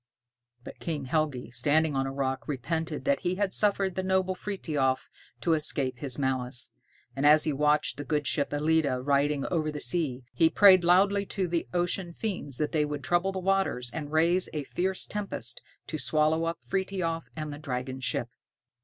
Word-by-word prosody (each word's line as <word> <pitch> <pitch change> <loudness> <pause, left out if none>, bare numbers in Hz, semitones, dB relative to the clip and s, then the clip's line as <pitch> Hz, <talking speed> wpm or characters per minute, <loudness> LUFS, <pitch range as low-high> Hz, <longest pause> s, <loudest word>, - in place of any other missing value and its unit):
But - - -10
King 150 -5 -3
Helgi 135 -4 -1
standing 145 +5 +2
on 135 0 0
a - - -3
rock 135 -1 -2
repented 155 +3 -3
that 280 0 +2
he 180 0 -1
had 195 0 -1
suffered 200 -2 +2
the 190 - -2
noble 190 0 +1
Frithiof 150 -9 -2 0.3
to 170 - +2
escape 140 -5 0
his 135 -3 -2
malice; 130 -3 +1 0.4
and 135 - -2
as 150 +1 +6
he 155 - 0
watched 150 +2 +1
the 145 - -4
good 150 0 -1
ship 145 -2 0
"Ellide" 145 -4 +1
riding 140 0 +2
over 155 -3 0
the 150 - -5
sea, 140 -7 -1
he 165 - +4
prayed 185 +1 +7
loudly 200 +3 +4
to 190 -2 -2
the 170 -1 -1
ocean 175 0 -1
fiends 180 - -4
that 150 - -1
they 155 -2 +2
would 145 -1 -4
trouble 175 +5 +1
the 190 - -5
waters 190 -10 0
and 150 -2 -5
raise 170 +4 +2
a 150 -2 -2
fierce 185 +6 -1
tempest 210 -1 -5 0.2
to 155 - -5
swallow 155 +2 +2
up 165 0 -2
Frithiof 185 -4 -2
and 155 -2 -5
the 145 - -8
dragon 130 -2 -4
ship. 120 -2 -1
155 Hz, 180 wpm, -28 LUFS, 140-180 Hz, 0.4 s, prayed